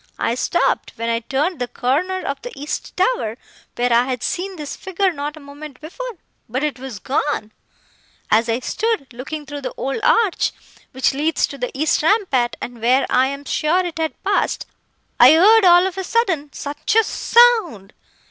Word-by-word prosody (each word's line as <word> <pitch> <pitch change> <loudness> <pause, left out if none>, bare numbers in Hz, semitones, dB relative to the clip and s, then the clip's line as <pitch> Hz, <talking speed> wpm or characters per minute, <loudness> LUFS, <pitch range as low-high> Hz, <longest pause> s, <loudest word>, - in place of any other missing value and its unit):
I 230 - 0
stopped, 255 - 0
when 230 0 -3
I 230 0 +1
turned 280 +8 -2
the 245 - -2
corner 330 +12 -1
of 275 0 -3
the - - -7
east 295 +2 -5
tower, 365 - 0 0.4
where 245 0 +1
I 240 +1 +4
had 255 -3 -3
seen 380 +2 -3
this 300 -4 -6
figure 380 0 -1
not 295 +1 -5
a - - -10
moment 285 -1 -11
before,—but 325 - -7
it 295 -4 -2
was 260 -4 -7
gone! 260 0 -2 0.8
As 225 +2 +3
I 230 +2 0
stood, 435 - -2
looking 290 +5 -6
through 290 0 -7
the 265 - -6
old 275 +11 -3
arch 440 -6 +2 0.4
which 260 +1 +1
leads 305 +4 +1
to 280 - -10
the 250 - -2
east 310 - +2
rampart, 310 - +2
and 240 -2 -8
where 255 +3 +3
I 260 +1 +4
am 280 +1 -6
sure 345 +6 +1
it 330 -2 -5
had 315 -5 -3
passed, 400 +1 0 0.5
I 255 +5 +9
heard, 410 +6 +6
all 350 0 +7
of 380 0 -3
a - - -2
sudden, 355 -9 0
such 290 +9 -3
a 450 - +6
sound! 435 - +3
295 Hz, 180 wpm, -20 LUFS, 255-370 Hz, 0.8 s, I